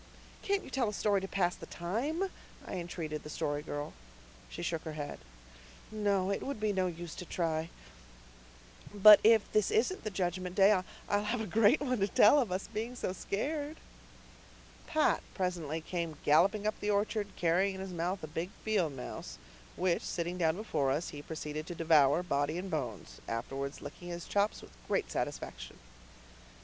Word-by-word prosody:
"Can't 400 0 0
you - - -11
tell 255 -5 +1
us 210 - -5
a - - -6
story 205 -2 +2
to 195 - -4
pass 180 -2 +1
the - - -10
time?" 285 - -2 0.3
I - - -7
entreated 165 -3 -4
the 150 - -9
Story 145 -1 -2
Girl. 145 -1 -5 0.6
She - - -6
shook 165 -2 -1
her 160 - -6
head. 145 -1 -5 0.7
"No, 200 -3 +1
it 200 - -1
would 275 -4 -4
be 215 -1 +1
no 185 -1 +1
use 170 -1 -6
to - - -7
try. 165 -2 -1 1.2
But 210 +1 +9
if 225 -1 +6
this 215 -2 +3
isn't 250 - +1
the 215 - -2
Judgment 180 -1 -2
Day 200 0 +6 0.4
I'll 205 0 +1
have 230 +3 0
a 220 - -2
great 220 - +4
one 255 -4 0
to 195 - +2
tell 210 +7 +6
of 235 -9 0
us 185 +2 -2
being 225 +3 -4
so 185 - -2
scared." 290 - -3 1.1
Pat 310 -1 +2
presently 170 -4 -2
came 165 -2 -3
galloping 195 +8 +4
up 215 - -1
the 210 - -2
orchard, 205 0 +1
carrying 180 +3 +2
in 190 - -6
his 190 -1 -6
mouth 175 +2 -2
a - - -4
big 165 +4 -3 0.2
field 195 -9 +1
mouse, 125 - -7 0.4
which, 180 -1 +1
sitting 175 +1 -3
down 160 -1 +3
before 160 -9 0
us, 150 +6 0
he 145 - -7
proceeded 155 0 -5
to 175 - -5
devour, 155 -1 +4
body 145 -1 0
and 185 +1 -5
bones, 110 - -4
afterwards 135 +5 -4
licking 145 +5 -9
his 175 -1 -5
chops 205 +1 0
with - - -13 0.2
great - - 0
satisfaction. - - -4
180 Hz, 180 wpm, -32 LUFS, 160-210 Hz, 1.2 s, But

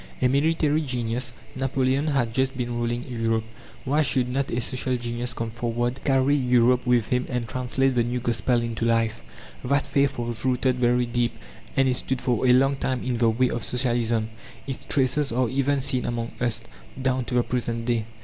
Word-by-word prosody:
A - - +3
military 150 +3 +2
genius, 125 -2 -2 0.2
Napoleon, 135 +2 0
had 130 -6 0
just 130 +1 0
been 120 -1 -2
ruling 120 +1 -2
Europe. 115 -2 -1 0.4
Why 145 +4 +2
should 130 -3 +1
not 135 +2 -1
a 120 - -1
social 130 +1 0
genius 120 0 -4
come 115 -1 -3
forward, 120 +2 -2
carry 135 0 +3
Europe 125 -1 +3
with 120 -3 +2
him 125 0 0
and 125 -2 -2
translate 130 +2 0
the 120 - +2
new 120 +1 -2
Gospel 120 0 +1
into 115 -1 -3
life? 115 - +1 0.4
That 140 +3 +1
faith 140 -1 +1
was 120 -1 +2
rooted 130 0 +1
very 125 0 +2
deep, 120 0 -1 0.4
and 135 0 +4
it 125 -1 +1
stood 130 -1 -2
for 125 0 0
a - - +6
long 135 +2 +4
time 130 -2 -2
in 125 -2 -1
the 115 -1 +3
way 125 +3 +1
of 120 - -3
Socialism; 120 -3 0 0.3
its 135 -2 -6
traces 140 +1 +1
are 125 +1 +1
even 140 +2 +1
seen 130 -1 +1
amongst 115 -1 -4
us, 120 -2 +1 0.4
down 130 -1 0
to 125 - -3
the 120 - +3
present 115 -2 -2
day. 115 -3 0
125 Hz, 190 wpm, -25 LUFS, 120-130 Hz, 0.4 s, a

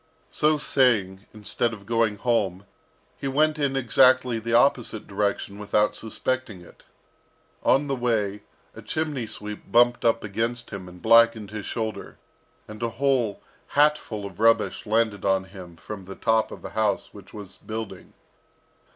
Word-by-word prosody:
So 155 0 +2
saying, 110 -9 +1
instead 110 +2 -2
of 100 -2 -10
going 115 -1 +1
home, 100 -5 0 0.5
he 140 - -4
went 155 +3 +2
in 140 -2 0
exactly 130 -1 +4
the 115 +1 -1
opposite 120 -4 +2
direction 100 0 -2
without 105 +1 +1
suspecting 115 -3 -3
it. 85 - -18 0.8
On 140 +2 +3
the 140 -1 -1
way, 110 -5 -1 0.3
a - - -9
chimney 150 -7 -3
sweep 105 0 -8
bumped 120 +1 +4
up 115 0 +2
against 115 +4 -3
him, 95 -3 -7
and 90 0 -15
blackened 115 -2 +5
his 110 -2 -6
shoulder, 110 -2 -5 0.5
and 105 +1 -10
a 115 - 0
whole 130 -6 +1 0.3
hatful 145 -8 +2
of 95 -2 -10
rubbish 115 -1 +2
landed 110 -2 +1
on 95 -1 +2
him 95 -3 -12
from 95 +2 -8
the 95 +1 -9
top 110 -1 +1
of - - -10
a - - -6
house 110 -2 -1
which 100 -1 -13
was 100 -3 -10
building. 110 -1 -7
110 Hz, 150 wpm, -25 LUFS, 100-120 Hz, 0.8 s, blackened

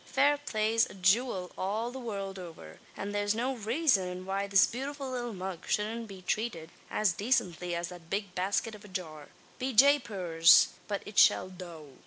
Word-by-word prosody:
Fair 285 +2 +3
play's 225 -2 +1
a - - -12
jewil 190 0 +1
all 215 +5 -2
the 265 - -7
world 195 -5 -5
over; 160 - -11 0.2
and 205 +1 -4
thare's 205 +1 0
no 255 +4 -1
raison 210 - 0
why 195 +1 -2
this 195 -1 +6
bewtiful 270 +2 -5
little 240 -2 -3
mug 185 -3 -6
showldn't 225 +2 -1
be 190 -2 -11
trated 195 -6 -2 0.2
as 210 -5 +1
dacently 180 -6 -1
as 170 0 -3
that 175 -2 -12
big 200 -1 -3
basket 195 +5 -1
av 210 - -12
a - - -12
jar. 160 -6 -7 0.3
Be 260 +1 -2
japers! 205 - +5 0.2
but 200 -1 -3
it 205 - 0
shall - - +5
tho'!" 170 -5 -10
200 Hz, 175 wpm, -30 LUFS, 180-235 Hz, 0.3 s, this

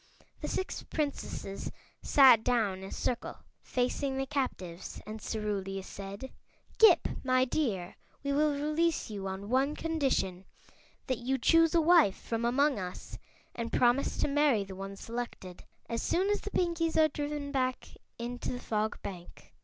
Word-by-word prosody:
The - - -3
six 375 - -3
Princesses 285 -9 -4 0.3
sat 255 -6 +7
down 220 -7 +1
in 190 - -8
a 195 - -8
circle 245 - -2 0.2
facing 265 +2 -1
the 270 - 0
captives 190 -11 -4
and 215 0 -7
Cerulia 195 -3 -3
said: 200 +7 -8 0.5
"Ghip, 400 -7 +7 0.2
my 255 -1 +3
dear, 210 - -2 0.3
we 280 0 0
will 300 +1 +3
release 305 0 0
you 195 -2 -4
on 190 +1 -5
one 265 +5 +2
condition: 270 - -1 0.6
That 255 -3 -1
you 260 +2 0
choose 330 +5 +4
a 335 - +5
wife 320 - +5
from 230 0 -3
among 275 +1 +2
us 180 -1 -7 0.3
and 230 -1 -4
promise 245 +3 +2
to - - +1
marry 285 -7 +3
the 195 -1 -9
one 195 +1 -6
selected, 225 -5 -6 0.2
as 230 0 -2
soon 380 +4 +1
as 415 - 0
the - - -5
Pinkies 335 -4 0
are 315 -1 +6
driven 290 -1 -4
back 255 -2 -1 0.3
into 240 +1 -4
the 245 - -4
Fog 215 -2 -2
Bank." 180 -3 -9
250 Hz, 155 wpm, -31 LUFS, 200-295 Hz, 0.6 s, sat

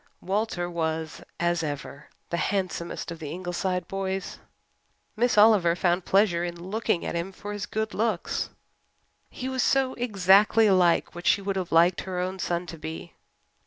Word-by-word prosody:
Walter 190 -2 -1
was, 160 -2 -3 0.2
as 175 -1 +1
ever, 145 -1 -6 0.2
the 170 - 0
handsomest 180 -1 -2
of 165 - -7
the 155 -3 -6
Ingleside 180 +1 -3
boys. 195 0 -4 0.8
Miss 235 0 +1
Oliver 205 -6 +6
found 175 0 +1
pleasure 190 -4 +3
in 175 -1 -4
looking 190 0 -1
at - - -3
him 170 +3 -3
for 205 +2 -7
his 205 -1 -5
good 220 0 -3
looks 215 -5 -1 0.8
he 255 - -6
was 260 -1 -1
so 265 0 +2
exactly 210 -1 +4
like 180 -3 +3
what 175 0 -6
she - - +5
would 195 0 -3
have 185 -2 -3
liked 170 +2 +4
her 185 -1 -5
own 185 +1 -2
son 175 0 -1
to 165 -2 -9
be. 160 +2 -7
180 Hz, 160 wpm, -26 LUFS, 170-205 Hz, 0.8 s, Oliver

